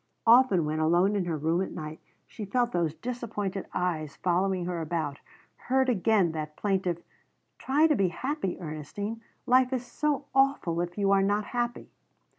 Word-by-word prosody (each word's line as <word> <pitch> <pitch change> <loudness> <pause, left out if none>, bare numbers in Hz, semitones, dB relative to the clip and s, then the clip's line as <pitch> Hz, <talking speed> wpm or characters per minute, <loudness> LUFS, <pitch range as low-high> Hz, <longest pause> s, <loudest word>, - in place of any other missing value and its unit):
Often 230 -8 +6
when 155 +1 -2
alone 175 +6 +3
in 195 -3 0
her 165 -2 -2
room 160 +4 +1
at 190 - -3
night 155 -1 -7 0.3
she 215 - -8
felt 240 +4 0
those 165 -5 0
disappointed 215 -6 -4
eyes 160 -5 -2
following 185 0 0
her 175 -2 -3
about, 155 -3 -3 0.5
heard 265 0 +3
again 205 -5 +3
that 155 -1 -5
plaintive: 185 -4 -1 0.6
"Try 290 +4 +3
to 310 -2 +4
be 195 -5 +2
happy, 225 - -3
Ernestine. 180 +8 -5 0.2
Life 255 +1 +4
is 255 -2 -2
so 290 +2 -1
awful 270 -11 +2
if 175 +1 -5
you 200 -1 +2
are 195 0 +5
not 205 +2 +1
happy." 240 +1 -3
195 Hz, 165 wpm, -28 LUFS, 170-240 Hz, 0.6 s, Often